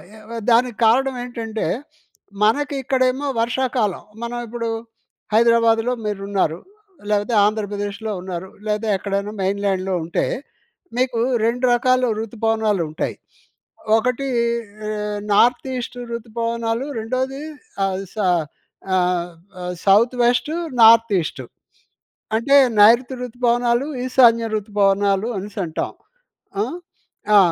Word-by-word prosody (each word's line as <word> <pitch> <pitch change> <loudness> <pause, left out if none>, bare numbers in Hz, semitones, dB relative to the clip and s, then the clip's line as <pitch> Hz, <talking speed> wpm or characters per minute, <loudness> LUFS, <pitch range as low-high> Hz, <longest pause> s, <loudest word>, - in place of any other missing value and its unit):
ఎ - - -13
వె 230 - -4
దానికి 235 -1 +3
కారణవేంటంటే, 240 -2 0 0.8
మనకి 285 +6 +1
ఇక్కడేమో 260 +2 +1
వర్షాకాలం. 240 -4 -1 0.2
మనవిప్పుడు, 235 -1 -4 0.7
హైదరాబాదులో 230 +1 +4
మీరున్నారు, 195 -5 -1 0.5
లేపోతే 210 +3 +1
ఆంధ్రప్రదేశ్‍లో 205 0 -2
ఉన్నారు, 185 0 -6 0.2
లేదా 210 +1 -1
ఎక్కడైనా 200 +1 -3
మెయిన్ 200 +1 -1
ల్యాండ్‌లో 190 -1 0
ఉంటే, 170 - -1 0.7
మీకు 250 -2 +1 0.3
2 245 +2 +1
రకాలు 255 +1 +2
ఋతుపవనాలుంటాయి. 215 -7 -1 0.8
ఒకటీ 250 +4 -1 0.6
ఆహ్, 210 -1 -3
నార్త్ 240 +5 +4
ఈస్ట్ 250 0 -5 0.2
ఋతుపవనాలు, 230 +1 -2
రెండోది 255 +4 -2 0.5
అల్ 195 0 -2
స - - -21
ఆహ్, 175 -3 +2 1.2
ఆహ్, 180 0 -4
సౌత్ 215 +6 +4
వెస్టు, 245 +6 +1 0.3
నార్త్ 225 0 +7
ఈస్టు. 140 -5 -5 0.9
అంటే, 275 +5 +3 0.2
నైరుతి 240 +5 +6
ఋతుపవనాలు, 240 +1 +1 0.2
ఈశాన్య 235 -3 +4
ఋతుపవనాలు 200 0 +1
అనేసి 205 +2 -7
అంటాం. 160 -2 -3 0.7
ఆ! - - +1 0.7
ఆ! - - +10
225 Hz, 100 wpm, -21 LUFS, 205-245 Hz, 1.2 s, ఆ